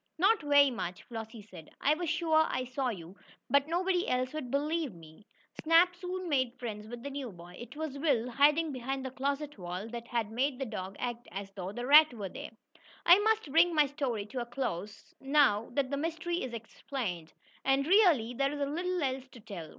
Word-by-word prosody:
"Not 395 +5 +4
very 285 -2 +5
much," 180 -7 -5
Flossie 225 -1 -8
said. 180 -6 -13
"I 290 - +3
was 335 +1 -3
sure 315 -1 +3
I 255 - -2
saw 255 +1 -2
you, 180 -4 -7 0.4
but 280 +1 +4
nobody 355 +2 0
else 255 +1 0
would 305 -5 -5
believe 295 - -1
me." 165 +4 -16 0.3
Snap 335 +3 +5
soon 365 +1 -5
made 260 -5 0
friends 215 -3 -6
with 240 +1 -8
the 280 - -5
new 270 -4 -5
boy. 175 0 -13
It 240 +2 -9
was 300 -3 -5
Will, 270 -6 +1
hiding 295 +5 +4
behind 265 +1 -4
the 260 - -4
closet 280 0 -3
wall, 180 +3 -5
that 235 0 -7
had 230 -3 -2
made 260 +3 0
the 270 - -3
dog 195 -4 -6
act 240 -1 -4
as 195 +1 -6
though 190 -2 -6
a 240 +5 -5
rat 295 -1 +7
were 200 -4 -5
there. - - -8 0.6
I 350 +3 +8
must 440 -7 +1
bring 335 +2 +5
my 300 -1 +5
story 265 -7 -3
to 245 +4 -5
a - - -3
close, 215 -6 -5
now 270 -6 +3
that 270 0 0
the 280 - 0
mystery 335 +3 -2
is 255 - -4
explained. 220 - -5 0.3
And, 270 +1 +2
really, 330 - +4
there 275 +3 0
is 295 - -5
little 345 +5 -1
else 265 -1 -2
to 255 - -15
tell. 180 -7 -8
265 Hz, 205 wpm, -31 LUFS, 225-305 Hz, 0.6 s, I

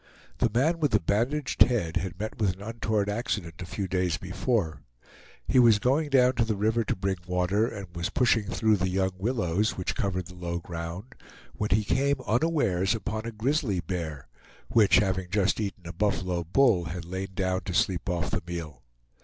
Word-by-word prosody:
The 120 - +3
man 155 +9 +2
with 150 -6 +1
the 105 - +5
bandaged 120 - -1
head 95 -10 +4
had 90 0 -4
met 110 +1 -5
with 100 -4 +2
an 95 - -15
untoward 110 -2 -1
accident 105 -6 -3
a 90 - -6
few 95 +1 -3
days 90 -4 0
before. 95 -2 -1 0.7
He 130 - +4
was 115 -4 +7
going 140 +7 +1
down 130 -2 +5
to 115 - +4
the 110 -1 -1
river 110 +3 +1
to - - 0
bring 95 0 -1
water, 90 +5 +1
and 100 -4 -6
was 85 0 -2
pushing 115 -4 +2
through 110 -1 +2
the 95 0 0
young 95 +1 +1
willows 105 -2 0
which 90 - -2
covered 90 -2 -1
the 90 - -11
low 85 -1 -4
ground, 85 +7 -6 0.4
when 105 - -2
he 105 +4 +3
came 140 +6 +1
unawares 110 - +1
upon 110 +1 -4
a - - -3
grizzly 115 - 0
bear, 80 -4 -4 0.4
which, 110 -3 +5
having 95 -2 +1
just 100 +2 +1
eaten 100 -4 -4
a 85 - -6
buffalo 90 -2 0
bull, 100 - +3
had 85 +1 -5
lain 95 +2 -4
down 95 0 0
to 90 - -3
sleep 95 0 +1
off 85 -2 -1
the - - -1
meal. 80 -6 -6
100 Hz, 190 wpm, -27 LUFS, 90-115 Hz, 0.7 s, was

